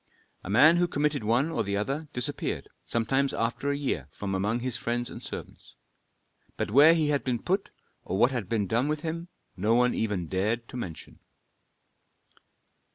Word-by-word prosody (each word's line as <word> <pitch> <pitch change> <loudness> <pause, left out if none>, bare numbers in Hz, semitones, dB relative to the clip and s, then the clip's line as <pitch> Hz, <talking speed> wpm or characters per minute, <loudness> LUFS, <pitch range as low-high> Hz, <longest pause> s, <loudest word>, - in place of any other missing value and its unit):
A - - -8
man 155 - +6
who 175 0 +3
committed 145 -4 0
one 120 +9 +2
or - - 0
the 100 0 -1
other 140 +9 -2
disappeared, 125 -2 -3 0.2
sometimes 135 +4 0
after 120 +5 -1
a 140 - 0
year, 130 - -2
from 95 +6 -5
among 105 +5 0
his 125 -1 -2
friends 120 0 -2
and - - -8
servants. - - -9 0.8
But - - -2
where 150 +7 +7
he 155 -3 +1
had 145 -1 +1
been 125 -2 0
put 195 - -1 0.3
or 95 - -3
what 120 +5 +4
had 120 -8 -3
been 110 -3 +1
done 120 +7 +1
with 150 0 -1
him, 165 +2 -4 0.3
no 105 +4 +2
one 125 +1 +3
even 105 -6 -1
dared 105 +7 -1
to - - -10
mention. 90 -10 -7
120 Hz, 175 wpm, -28 LUFS, 105-145 Hz, 0.8 s, where